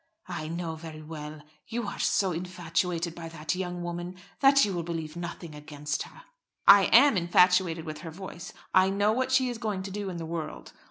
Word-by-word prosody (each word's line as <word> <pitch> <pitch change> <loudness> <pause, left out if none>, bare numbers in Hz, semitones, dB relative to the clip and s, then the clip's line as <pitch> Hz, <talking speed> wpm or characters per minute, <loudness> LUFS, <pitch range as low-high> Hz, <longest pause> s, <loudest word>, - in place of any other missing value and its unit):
"I 155 - -4
know 165 0 -3
very 155 -1 -9
well. 150 -1 -8 0.2
You 235 0 -3
are 200 - -6
so 190 -2 +2
infatuated 175 0 -2
by 165 -1 -8
that 155 -1 -3
young 180 -1 -4
woman 175 +1 -5 0.2
that 275 -1 +6
you 200 - -2
will 175 - -1
believe 165 -2 -5
nothing 170 -1 -6
against 150 0 -4
her." - - -10 0.4
"I 200 -1 +9
am 275 +2 +6
infatuated 175 -1 +3
with 155 -1 -6
her 165 - -7
voice; 185 +1 -8 0.2
I 185 0 +5
know 205 +2 +2
what 260 +3 0
she 260 -1 +4
is 240 -2 -4
going 210 -5 -2
to 195 - -6
do 205 0 -4
in 180 - -5
the 165 - -5
world. 160 -1 -6
175 Hz, 200 wpm, -28 LUFS, 160-195 Hz, 0.4 s, I